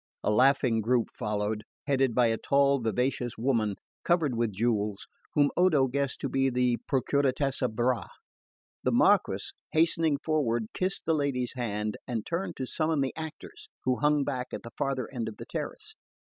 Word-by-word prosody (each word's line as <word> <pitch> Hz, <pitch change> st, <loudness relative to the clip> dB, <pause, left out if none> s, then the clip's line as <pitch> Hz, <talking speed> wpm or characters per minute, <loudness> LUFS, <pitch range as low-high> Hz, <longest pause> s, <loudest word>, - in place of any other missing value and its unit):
A -, -, +2 dB
laughing 125 Hz, 0 st, +4 dB
group 120 Hz, +1 st, +1 dB
followed, 105 Hz, 0 st, -2 dB, 0.2 s
headed 135 Hz, -4 st, +1 dB
by 125 Hz, -, +5 dB
a 115 Hz, -, 0 dB
tall 140 Hz, +2 st, +3 dB
vivacious 120 Hz, +2 st, -1 dB
woman 110 Hz, -4 st, +1 dB, 0.3 s
covered 165 Hz, -6 st, +2 dB
with 115 Hz, -1 st, 0 dB
jewels, 105 Hz, -1 st, -1 dB, 0.3 s
whom 145 Hz, -1 st, +4 dB
Odo 170 Hz, -7 st, +4 dB
guessed 140 Hz, +1 st, -2 dB
to -, -, -1 dB
be 135 Hz, 0 st, +1 dB
the 125 Hz, -1 st, +1 dB
Procuratessa 135 Hz, -1 st, +1 dB
Bra. 120 Hz, +3 st, 0 dB, 0.7 s
The -, -, +1 dB
Marquess, -, -, +3 dB, 0.2 s
hastening 160 Hz, -2 st, +3 dB
forward, 125 Hz, -8 st, 0 dB
kissed 185 Hz, +1 st, -1 dB
the 165 Hz, -, +2 dB
lady's 140 Hz, -5 st, -1 dB
hand, 105 Hz, -4 st, -3 dB
and 115 Hz, -4 st, -3 dB
turned 175 Hz, +3 st, -3 dB
to 130 Hz, -, -2 dB
summon 155 Hz, +2 st, 0 dB
the 135 Hz, -, -2 dB
actors, 290 Hz, -, -8 dB
who 130 Hz, -1 st, +1 dB
hung 150 Hz, -1 st, +3 dB
back 130 Hz, -3 st, -3 dB
at -, -, -8 dB
the 115 Hz, -, -9 dB
farther 135 Hz, -3 st, -1 dB
end 115 Hz, -3 st, -2 dB
of 105 Hz, -, -11 dB
the -, -, -8 dB
terrace. -, -, -5 dB
130 Hz, 165 wpm, -28 LUFS, 115-140 Hz, 0.7 s, by